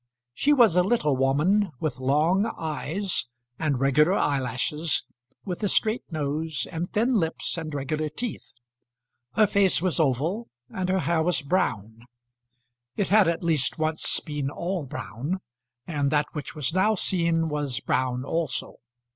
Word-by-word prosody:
She 285 - +2
was 235 - +5
a 180 - +6
little 180 - +1
woman 155 +9 +2
with 140 -5 -3
long 160 - +2
eyes, 160 +2 -2 0.3
and 150 -5 0
regular 145 +6 +4
eyelashes, 145 - 0 0.4
with 180 -1 -4
a 210 - +1
straight 220 +4 +2
nose, 155 0 -2
and 165 +2 -4
thin 235 +5 +2
lips 165 -8 0
and 160 -2 -5
regular 150 +2 -2
teeth. 230 +10 -6 0.8
Her 215 - +5
face 200 -2 +3
was 180 -1 0
oval, 160 - 0 0.2
and 185 -1 -2
her 190 0 +2
hair 170 -1 +1
was 165 -2 0
brown. 115 - -1 0.9
It 200 - 0
had 210 -2 +5
at 170 +1 -1
least 155 -6 +3
once 155 0 +1
been 145 -3 -3
all 170 +2 -3
brown, 140 - -4 0.5
and 145 -4 0
that 150 +1 +2
which 150 0 -6
was 150 0 -1
now 210 +4 +3
seen 170 -4 +1
was 145 -6 -2
brown 130 +2 -1
also. 160 -4 -2
160 Hz, 145 wpm, -26 LUFS, 140-185 Hz, 0.9 s, a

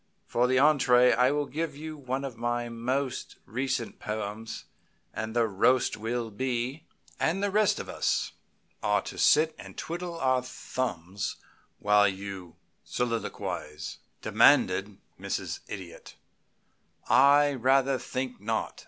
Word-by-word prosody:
For 120 +1 +1
the 130 - +2
entrée 130 -3 +5
I 125 +1 +4
will 145 +1 0
give 155 +2 -3
you 155 +2 -7
one 135 -1 -3
of 130 -4 -6
my 120 +1 -2
most 130 +3 -2
recent 125 0 -3
poems, 105 +1 -5 0.5
and 110 +1 -4
the 120 -1 +4
roast 120 +5 +2
will 115 +1 -3
be 130 +6 -2 0.2
" - - -28
"And 185 +5 +1
the 205 - +1
rest 210 0 +3
of - - -6
us - - 0 0.5
are 105 -1 +2
to - - -7
sit 155 +1 +5
and - - -11
twiddle 170 0 -5
our 130 -2 +2
thumbs 100 -7 -4 0.4
while 105 0 +4
you 95 -3 -6 0.3
soliloquize?" 95 -9 -3 0.3
demanded - - +4 0.2
Mrs. - - -3
Idiot. 95 -4 -9 0.9
"I 145 +1 +6
rather 135 +1 +2
think 130 -4 -4
not. 110 +1 -2
125 Hz, 130 wpm, -28 LUFS, 110-135 Hz, 0.9 s, I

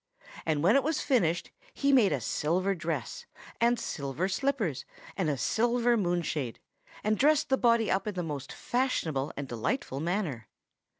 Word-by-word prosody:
And 155 -2 +1
when 195 +6 +5
it 275 - +5
was 310 +1 0
finished 175 - +1 0.2
he 280 0 +2
made 235 -7 +5
a - - 0
silver 185 +6 0
dress, 160 -7 -4 0.3
and 235 0 +3
silver 140 - -2
slippers, 210 - -1 0.3
and 180 -6 0
a 145 - 0
silver 240 - +2
moonshade, 175 - -1 0.5
and 215 0 +1
dressed 300 +2 +3
the 265 - +4
body 230 -3 +3
up 195 +2 0
in 210 - -3
the 180 - -2
most 145 -4 -5
fashionable 165 - -1
and 140 -1 -4
delightful 130 - -2
manner. 160 - -2
185 Hz, 160 wpm, -29 LUFS, 150-240 Hz, 0.5 s, when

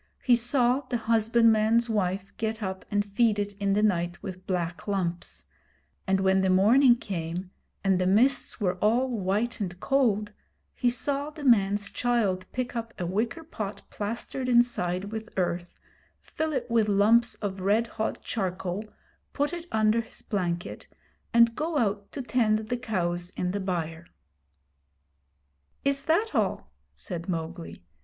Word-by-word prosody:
He 245 - +5
saw 245 +1 +2
the 245 - 0
husbandman's 225 0 +3
wife 195 -3 -1
get 220 0 -2
up 190 -1 -4
and 205 0 +1
feed 210 +1 +2
it 205 0 -2
in 200 -1 +1
the 210 +1 +2
night 175 -4 0
with 185 -2 -8
black 175 -1 -2
lumps; 180 -4 -2 0.6
and 190 0 +2
when 190 0 +3
the 190 - +2
morning 235 +7 +6
came 180 -4 -5 0.3
and 190 -2 +3
the 180 - +2
mists 245 +9 +2
were 180 -3 0
all 240 +6 +2
white 210 +2 -1
and 185 -3 -4
cold, 215 -6 +1 0.4
he 245 - +1
saw 275 +4 -1
the 305 -1 -10
man's 205 -5 +3
child 215 -7 0
pick 250 -1 -3
up 230 0 -4
a 180 - -3
wicker 220 - -2
pot 215 -10 -6
plastered 235 +4 -3
inside 205 -6 +2
with 220 0 -5
earth, 175 -1 -2 0.4
fill 315 0 -3
it 285 - -1
with 230 -3 +2
lumps 225 +4 +4
of 195 -2 -4
red 210 +5 +2
hot 220 -1 -4
charcoal, 185 -1 -3 0.5
put 290 +3 0
it 345 0 -6
under 220 +1 +3
his - - -12
blanket, 175 -4 -3 0.4
and 235 0 +5
go 310 +5 -2
out 205 -5 -1
to 275 - -5
tend 230 -4 +2
the 220 +3 -3
cows 175 -7 -2
in 180 0 -1
the 200 - -2
byre. 170 -3 -3 1.8
'Is 275 0 0
that 385 +8 +2
all?' - - -1 0.2
said 175 -2 -6
Mowgli. 165 - -5
210 Hz, 150 wpm, -27 LUFS, 185-240 Hz, 1.8 s, morning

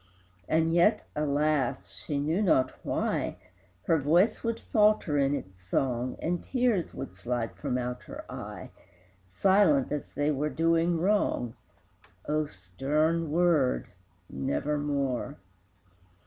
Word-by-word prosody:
And 160 +1 +2
yet, 190 +6 +3
alas! 150 -2 0
she 145 - -4
knew 155 +7 0
not 130 -10 +3
why, - - -1 0.5
Her 165 - +2
voice 175 +10 +3
would 230 -1 -1
falter 210 -9 +2
in 140 +1 +2
its 95 -7 -8
song, 125 +6 -1
And 175 +1 -2
tears 245 -8 0
would - - -6
slide 115 +5 -3
from 125 - -2
out 125 0 -3
her - - -9
eye, - - -8 0.6
Silent, 185 - +3
as 150 - -4
they 145 +1 +1
were 150 +1 -1
doing 165 +2 +2
wrong. 175 - +1 0.7
O 155 0 0
stern 150 - -1
word 165 -6 +2 0.4
Nevermore! 140 0 -2
150 Hz, 120 wpm, -28 LUFS, 135-170 Hz, 0.7 s, yet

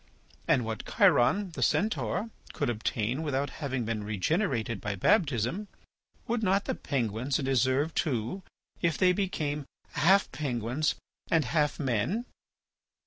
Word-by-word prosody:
And 125 - +3
what 110 -1 -4
Chiron, 185 +10 +4
the 165 - -6
Centaur, 220 +1 0 0.2
could - - 0
obtain 115 +3 -1
without 140 -2 -1
having 135 -4 -2
been 110 -1 -2
regenerated 115 - -1
by 105 -1 -2
baptism, 145 - +1 0.6
would 235 0 -1
not 195 -1 +2
the - - -1
penguins 125 -1 -1
deserve 135 +2 +1
too, 130 - -1 0.4
if 170 -2 +1
they 185 -1 +4
became 150 -7 -2 0.2
half 190 +7 +4
penguins 130 +1 -1 0.3
and 160 -4 +3
half 150 +3 +1
men? 135 - 0
140 Hz, 125 wpm, -29 LUFS, 120-175 Hz, 0.6 s, Chiron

